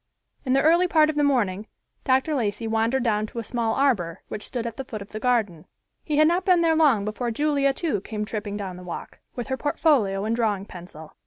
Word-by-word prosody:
In 255 Hz, -, +1 dB
the 275 Hz, -, +3 dB
early 340 Hz, +4 st, +4 dB
part 310 Hz, -2 st, +4 dB
of -, -, -12 dB
the 295 Hz, -, +2 dB
morning 215 Hz, -7 st, +1 dB, 0.4 s
Dr. 265 Hz, +4 st, +2 dB
Lacey 230 Hz, -4 st, -1 dB
wandered 225 Hz, +3 st, +1 dB
down 215 Hz, -2 st, 0 dB
to 235 Hz, -, -13 dB
a 230 Hz, -, -2 dB
small 225 Hz, 0 st, -1 dB
arbor, 200 Hz, -12 st, 0 dB
which 210 Hz, -, -5 dB
stood 240 Hz, -3 st, -4 dB
at 230 Hz, -1 st, -4 dB
the 270 Hz, -, -5 dB
foot 215 Hz, -5 st, -7 dB
of 200 Hz, -, -18 dB
the 215 Hz, -, -5 dB
garden. 215 Hz, -10 st, 0 dB, 0.4 s
He 300 Hz, -2 st, -1 dB
had 310 Hz, 0 st, +6 dB
not 350 Hz, +3 st, +1 dB
been 365 Hz, -3 st, +4 dB
there 325 Hz, -1 st, +3 dB
long 275 Hz, -11 st, +3 dB
before 225 Hz, +3 st, -3 dB
Julia, 280 Hz, +2 st, +1 dB
too, 270 Hz, -, -2 dB
came 210 Hz, 0 st, -4 dB
tripping 210 Hz, -1 st, -4 dB
down 190 Hz, -3 st, -6 dB
the 180 Hz, -, -10 dB
walk, 175 Hz, -1 st, -8 dB, 0.2 s
with 245 Hz, -3 st, -5 dB
her 265 Hz, -, -1 dB
portfolio 250 Hz, -10 st, +1 dB
and 225 Hz, +1 st, 0 dB
drawing 210 Hz, -4 st, 0 dB
pencil. 170 Hz, -5 st, -11 dB
235 Hz, 230 wpm, -24 LUFS, 205-285 Hz, 0.4 s, had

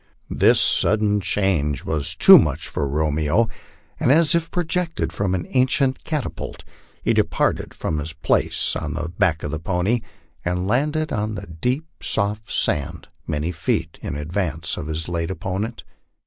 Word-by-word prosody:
This -, -, +4 dB
sudden 105 Hz, -1 st, +2 dB
change 85 Hz, -7 st, 0 dB
was 75 Hz, -3 st, +2 dB
too -, -, +9 dB
much -, -, -1 dB
for 70 Hz, -, -2 dB
Romeo, 75 Hz, +8 st, +1 dB, 0.5 s
and 125 Hz, -, +3 dB
as 155 Hz, +1 st, +6 dB
if 170 Hz, -1 st, 0 dB
projected 165 Hz, -, -2 dB
from 95 Hz, +1 st, 0 dB
an 90 Hz, -, -3 dB
ancient 130 Hz, +1 st, +2 dB
catapult, 150 Hz, -4 st, -4 dB, 0.4 s
he -, -, +2 dB
departed -, -, 0 dB
from 75 Hz, -, -2 dB
his 75 Hz, +2 st, -4 dB
place 80 Hz, -, +1 dB
on 80 Hz, -1 st, -3 dB
the 85 Hz, -1 st, -3 dB
back 85 Hz, -2 st, 0 dB
of 75 Hz, -, -3 dB
the 80 Hz, -, -3 dB
pony, 95 Hz, +8 st, 0 dB, 0.4 s
and 90 Hz, +1 st, -1 dB
landed 150 Hz, +7 st, 0 dB
on 110 Hz, -1 st, -2 dB
the 95 Hz, +1 st, -6 dB
deep, 125 Hz, -, -2 dB, 0.2 s
soft 105 Hz, +1 st, -1 dB
sand, 70 Hz, -2 st, -1 dB, 0.2 s
many 75 Hz, +3 st, -2 dB
feet 80 Hz, 0 st, -2 dB
in -, -, -4 dB
advance 80 Hz, 0 st, -2 dB
of 75 Hz, -, -6 dB
his 80 Hz, +1 st, -3 dB
late 85 Hz, -1 st, -2 dB
opponent. 95 Hz, +5 st, -4 dB
90 Hz, 155 wpm, -22 LUFS, 80-115 Hz, 0.5 s, too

